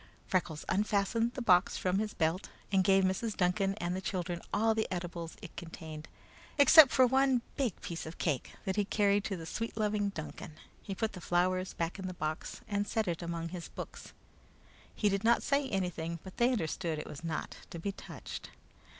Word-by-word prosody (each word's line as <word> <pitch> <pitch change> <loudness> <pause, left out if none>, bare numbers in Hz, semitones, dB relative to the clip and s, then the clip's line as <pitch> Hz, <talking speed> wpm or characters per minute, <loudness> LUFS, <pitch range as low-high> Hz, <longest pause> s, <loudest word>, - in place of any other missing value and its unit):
Freckles 175 -5 -1
unfastened 210 +4 +1
the 255 - -3
box 180 -4 +4
from 185 +1 +1
his 215 0 -2
belt, 165 +3 0 0.2
and 190 -1 +4
gave 195 0 +5
Mrs. 190 +4 0
Duncan 195 +2 +2
and 175 -4 -2
the 190 - -3
children 175 -3 -2
all 220 +2 +3
the 220 0 0
eatables 175 -2 -4
it 180 - -9
contained, 160 -2 -8 0.5
except 285 0 +9
one 260 -1 +4
big 255 - -1
piece 170 -2 -5
of 160 - -8
cake 145 -7 -1
that 190 +1 -1
he 205 - +4
carried 200 0 +2
to 195 - -2
the 165 - -7
sweet 225 +8 -4
loving 210 -1 +1
Duncan. 160 -2 -7 0.3
He 195 - -5
put 220 +2 -1
the 180 - -8
flowers 185 +2 +1
back 170 +4 -2
in 190 - -4
the 185 - -5
box 155 -1 -4
and 205 -1 -1
set 220 -2 0
it 170 -1 -1
among 170 -1 -3
his 175 -1 -6
books. - - -8 0.8
He 210 - +2
did 195 0 +1
not 235 +1 +4
say 280 -1 +1
anything, 175 -4 -2
but 190 - -10
they 240 +2 +4
understood 165 -6 -1
it 150 - -5
was 150 - -9
not 165 -2 -3
to - - -7
be 195 +5 -2
touched. - - -8
190 Hz, 195 wpm, -32 LUFS, 170-215 Hz, 0.8 s, except